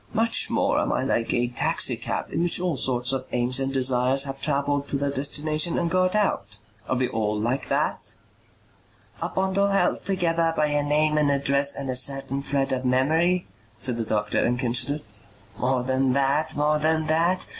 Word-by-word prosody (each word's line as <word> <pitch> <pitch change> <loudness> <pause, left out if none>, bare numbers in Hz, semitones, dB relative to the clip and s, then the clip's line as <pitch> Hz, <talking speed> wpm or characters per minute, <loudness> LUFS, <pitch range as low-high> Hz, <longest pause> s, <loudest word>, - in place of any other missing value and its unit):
Much 230 +1 +1
more - - +1
am - - 0
I - - 0
like 115 - 0
a 120 0 +1
taxi 120 - 0
cab - - -5
in - - 0
which 175 0 +1
all 180 -3 -1
sorts 125 -1 0
of 130 -1 -3
aims 125 +2 +1
and 135 0 -1
desires 130 0 +1
have 135 -1 -6
travelled 145 -1 -1
to - - 0
their 140 0 -1
destination 150 +4 0
and 170 -1 -1
got 185 +2 +2
out. 110 - -1 0.3
Are - - +1
we 130 0 +1
all 105 -2 -2
like 125 +5 -2
that?" - - -1 1.1
"A - - -2
bundle 190 +1 +1
held 195 -3 +1
together 170 -3 0
by 150 -1 +2
a 145 0 +1
name 150 +1 +2
and 150 -1 +2
address 140 0 +2
and 140 - -5
a 130 - -2
certain 135 +1 0
thread 140 -1 0
of 130 0 -2
memory?" 160 +8 +2 0.3
said 125 -3 0
the 115 - -1
doctor 105 -1 -1
and 120 +1 +1
considered. 125 +4 0 0.6
"More 125 0 0
than 130 0 +1
that. 140 +3 +1
More 150 +1 +2
than 160 +1 +1
that. 170 +4 +1
140 Hz, 190 wpm, -24 LUFS, 130-160 Hz, 1.1 s, got